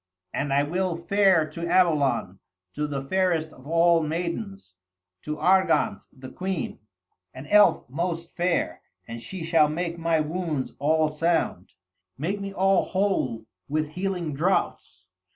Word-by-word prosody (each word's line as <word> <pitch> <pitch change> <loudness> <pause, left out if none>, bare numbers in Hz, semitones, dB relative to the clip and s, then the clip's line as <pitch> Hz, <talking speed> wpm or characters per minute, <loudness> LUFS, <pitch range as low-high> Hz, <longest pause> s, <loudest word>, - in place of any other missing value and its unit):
And 145 0 -2
I 140 +1 +3
will 175 +3 -1
fare 185 -2 +3
to 170 +2 -5
Avalon, 150 - +2 0.3
to 150 0 -2
the 140 -2 -4
fairest 165 -1 0
of 130 +2 -15
all 165 +1 +4
maidens, 170 - -4 0.5
to 150 - -4
Argante 190 +4 +2
the 130 -1 -11
queen, 185 -1 -4 0.6
an 130 +2 -8
elf 210 +4 +4
most 170 +4 -4
fair, 170 - 0 0.3
and 115 0 -7
she 185 +6 -7
shall 160 -2 +3
make 170 +2 -3
my 165 -1 +1
wounds 155 -3 -2
all 155 +2 +2
sound, 160 - -1 0.4
make 190 +8 -2
me 200 0 -4
all 195 0 +2
whole 180 - -1 0.2
with 155 +1 -1
healing 180 -2 -3
draughts. 145 - -1
165 Hz, 135 wpm, -25 LUFS, 150-185 Hz, 0.6 s, all